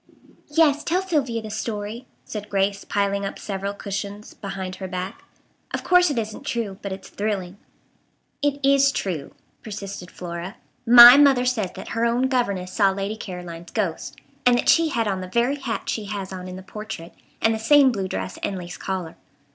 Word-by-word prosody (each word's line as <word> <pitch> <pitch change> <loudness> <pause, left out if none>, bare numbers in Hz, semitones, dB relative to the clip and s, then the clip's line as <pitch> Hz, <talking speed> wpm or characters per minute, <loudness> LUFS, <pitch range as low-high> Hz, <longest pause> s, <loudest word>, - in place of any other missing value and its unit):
"Yes, 300 -1 +3
tell 360 +3 0
Sylvia 270 -11 -1
the 215 - -7
story," 220 +2 -4 0.2
said 210 -1 -6
Grace, 200 0 0
piling 200 0 0
up 195 - -4
several 200 0 -4
cushions 200 +1 -6
behind 190 -2 -6
her 190 - -5
back. 185 +1 -5 0.5
"Of - - -5
course 360 -1 +5
it 285 - -2
isn't 220 -1 -4
true, 215 -5 -3
but 200 - -5
it's 190 0 -7
thrilling." 200 -3 -3 0.8
"It 285 0 0
is 275 0 +5
true," 180 - -4 0.3
persisted 200 -4 -7
Flora. 175 +3 -7 0.3
"My 240 +2 +11
mother 275 -3 +5
says 225 -7 0
that - - -9
her 230 0 -1
own 240 +3 +2
governess 200 -8 -1
saw 200 -3 +4
Lady 195 +2 -3
Caroline's 175 -5 -8
ghost. - - -2 0.3
And 245 -1 +5
that - - +1
she 330 -1 +5
had 230 -6 0
on 190 -2 -1
the 185 - -6
very 240 +8 +1
hat 245 -5 -4
she 215 - -2
has 195 -2 -5
on 185 -1 -7
in 180 - -7
the 185 - -9
portrait, 210 -4 -8 0.3
and 225 - +3
the 220 - -3
same 275 +3 +6
blue 195 -5 -2
dress 95 - -5
and 195 - -2
lace 175 -1 -7
collar. 185 -4 -4
205 Hz, 185 wpm, -23 LUFS, 190-245 Hz, 0.8 s, My